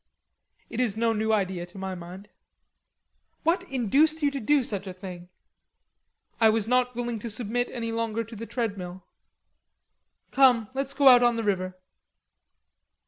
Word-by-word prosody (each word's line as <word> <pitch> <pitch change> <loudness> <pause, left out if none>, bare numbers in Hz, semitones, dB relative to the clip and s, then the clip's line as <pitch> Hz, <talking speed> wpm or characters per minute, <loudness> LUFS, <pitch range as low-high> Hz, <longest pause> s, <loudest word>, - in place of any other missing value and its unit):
"It 230 - -6
is 225 -5 0
no 230 0 +2
new 220 0 0
idea 190 -4 -1
to 180 - -15
my 190 0 -4
mind." 180 +3 -9 1.2
"What 335 +4 +2
induced 280 +6 +2
you 285 - +3
to 280 - -4
do 280 +4 +2
such 200 -4 -3
a 185 - -5
thing?" 180 -2 -9 1.1
"I 225 -1 +6
was 220 -1 +1
not 250 0 +1
willing 240 -2 -3
to 235 - -5
submit 240 +2 -1
any 230 -2 -4
longer 230 0 -2
to 230 +1 -11
the 230 +2 -7
treadmill." 190 -6 -4 1.3
"Come 245 -5 +4
let's 275 +1 -3
go 280 0 +4
out 250 -2 +9
on 240 -1 +3
the 230 - -2
river." 185 -3 -1
225 Hz, 155 wpm, -26 LUFS, 195-250 Hz, 1.3 s, out